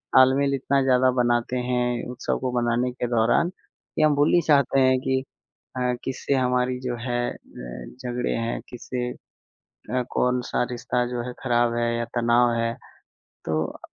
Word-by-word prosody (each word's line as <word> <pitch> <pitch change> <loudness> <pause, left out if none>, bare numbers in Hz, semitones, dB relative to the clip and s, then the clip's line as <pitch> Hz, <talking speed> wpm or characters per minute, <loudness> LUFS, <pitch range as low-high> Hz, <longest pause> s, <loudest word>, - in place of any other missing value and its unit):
तालमेल 135 +2 +5
इतना 135 +1 +1
ज़्यादा 130 -1 +4
बनाते 120 +1 +1
हैं 125 -1 0
उत्सव 125 - -2
को 130 - -2
मनाने 120 +1 +1
के 125 0 -3
दौरान, 120 +8 +2
कि 185 - -9
हम 155 -1 +4
भूल 145 +1 +3
ही 175 - +5
जाते 140 -3 +4
हैं 130 -1 +4
कि 130 0 0 0.5
अ, 125 -1 +1
किससे 135 +1 -2
हमारी 125 -1 +1
जो 125 -2 -3
है 120 0 0
अ, - - -12 0.7
झगड़े 125 0 -1
हैं? 115 0 -2
किससे 125 0 -4 0.6
अ, 125 +3 -4
कौन-सा 125 -1 0
रिश्ता 125 0 -1
जो 120 -1 -3
है 125 - -5
ख़राब 120 -2 +2
है 120 0 0
या 120 - -1
तनाव 120 +1 +4
है? 115 0 0 0.7
तो 80 0 -2
125 Hz, 160 wpm, -24 LUFS, 120-130 Hz, 0.7 s, तालमेल